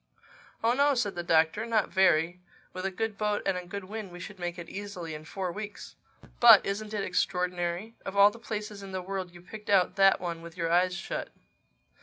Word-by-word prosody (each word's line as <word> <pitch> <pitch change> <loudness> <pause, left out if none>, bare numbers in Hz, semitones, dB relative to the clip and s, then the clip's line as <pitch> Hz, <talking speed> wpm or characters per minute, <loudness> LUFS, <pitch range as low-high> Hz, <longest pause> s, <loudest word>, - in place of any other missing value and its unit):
"Oh, 230 +1 +4
no," 280 +2 +3
said 225 -5 0
the 175 - -3
Doctor—"not 190 +7 +2
very. 175 -2 +3 0.3
With 185 +1 -3
a - - -1
good 215 +2 -3
boat 210 -1 0
and 195 - +1
a 180 -1 -5
good 200 +1 -5
wind 205 0 -7
we 175 - -10
should 190 +2 -9
make 175 0 -4
it 170 - -7
easily 195 -5 -6
in 155 0 -8
four 185 +2 -4
weeks. 210 +2 -8 0.4
But 230 -4 +9
isn't 210 +2 -3
it 205 - -1
extraordinary? 180 +2 -1
Of 195 +1 -5
all 200 +1 +8
the 230 - -12
places 210 -3 -5
in 195 -1 -9
the 185 - -2
world 190 -1 -4
you 175 0 -14
picked 210 +3 -10
out 195 -1 +3
that 195 0 +6
one 170 -2 -4
with 170 +1 -11
your 165 -1 -1
eyes 180 +1 +3
shut. 190 - -4
190 Hz, 210 wpm, -29 LUFS, 175-210 Hz, 0.4 s, But